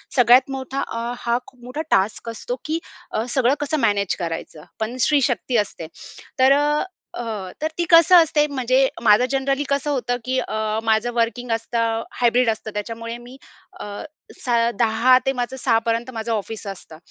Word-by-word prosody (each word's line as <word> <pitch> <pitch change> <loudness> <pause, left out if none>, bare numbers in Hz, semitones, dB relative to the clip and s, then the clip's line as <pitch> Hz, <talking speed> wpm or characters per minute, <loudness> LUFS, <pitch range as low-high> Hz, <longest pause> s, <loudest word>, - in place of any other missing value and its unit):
सगळ्यात 250 +1 +6
मोठा 270 0 -4
अ, 230 +1 -4
हा 235 0 0
खूप 250 -2 -18
मोठा 255 +5 -4
टास्क 205 +4 +1
असतो 230 +2 -5
की 315 +2 -1 0.3
अ, 220 - -1
सगळं 250 +1 +2
कसं 295 +1 -1
मॅनेज 205 -5 +1
करायचं. 165 -2 -5 0.2
पण 220 +3 -3
स्त्री 295 -2 +3
शक्ती 240 +2 -1
असते. 195 -6 -2 0.5
तर 260 +1 +6 0.6
अ, - - -3 0.4
तर 310 - +1
ती 345 - +1
कसं 335 +1 +7
असते 305 -2 +1
म्हणजे 260 -1 +2 0.2
माझं 215 +2 +5
जनरली 275 +1 0
कसं 280 +1 0
होतं 245 -3 -1
की 260 +1 -1
अ, 220 -2 -2
माझं 220 +1 +1
वर्किंग 235 +1 -1
असतं, 230 0 -1 0.2
हायब्रिड 240 0 +3
असतं 220 0 -3
त्याच्यामुळे 230 +2 -5
मी 245 +2 -13 0.4
अ, - - -6 0.6
स - - -5 0.3
10:00 235 +2 +4
ते 270 - +2
माझं 250 0 -3
06:00पर्यंत 230 0 0
माझं 225 0 -4
ऑफिस 215 0 -5
असतं. 185 -5 -9
240 Hz, 165 wpm, -22 LUFS, 225-265 Hz, 0.6 s, कसं